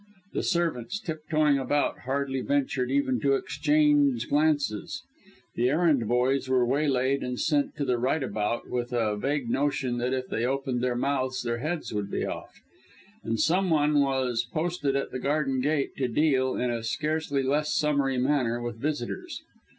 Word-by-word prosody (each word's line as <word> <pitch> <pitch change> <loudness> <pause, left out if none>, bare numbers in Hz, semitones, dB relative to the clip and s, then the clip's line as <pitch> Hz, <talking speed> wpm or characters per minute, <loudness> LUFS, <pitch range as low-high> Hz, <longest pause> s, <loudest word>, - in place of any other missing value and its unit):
The - - 0
servants, 170 - -1
tiptoeing 155 -4 +1
about, 145 +2 0
hardly 135 0 -1
ventured 135 -2 0
even 130 -2 +1
to 135 +4 +3
exchange 145 -3 +2
glances; 145 -7 0 0.5
the 120 +2 +1
errand 150 -6 +2
boys 130 +3 +1
were 130 -1 +3
waylaid 135 0 +1
and 125 0 -3
sent 285 -1 +1
to 145 - -2
the 125 -2 +1
right 135 +5 +1
about, 110 0 -2
with 120 0 -3
a 110 -3 +1
vague 135 +4 -1
notion 135 -1 0
that 125 +1 -1
if 130 -1 -2
they 115 - -2
opened 130 -1 -1
their 125 -1 0
mouths 130 0 -1
their 120 0 -2
heads 155 +2 -3
would 105 -1 -2
be - - -2
off; - - -7 0.6
and 115 -1 -2
some 185 - +2
one 150 -2 +3
was 130 -4 0
posted 155 +2 -2
at 140 - -1
the 130 - -4
garden 135 -1 0
gate 145 +1 0
to 130 - 0
deal, 130 0 +2
in 125 -1 0
a 115 -1 -2
scarcely 150 +3 -1
less 150 +3 +1
summary 140 -3 +1
manner, 125 -3 +1
with 120 -1 -5
visitors. 140 -1 -4
135 Hz, 165 wpm, -27 LUFS, 125-150 Hz, 0.6 s, to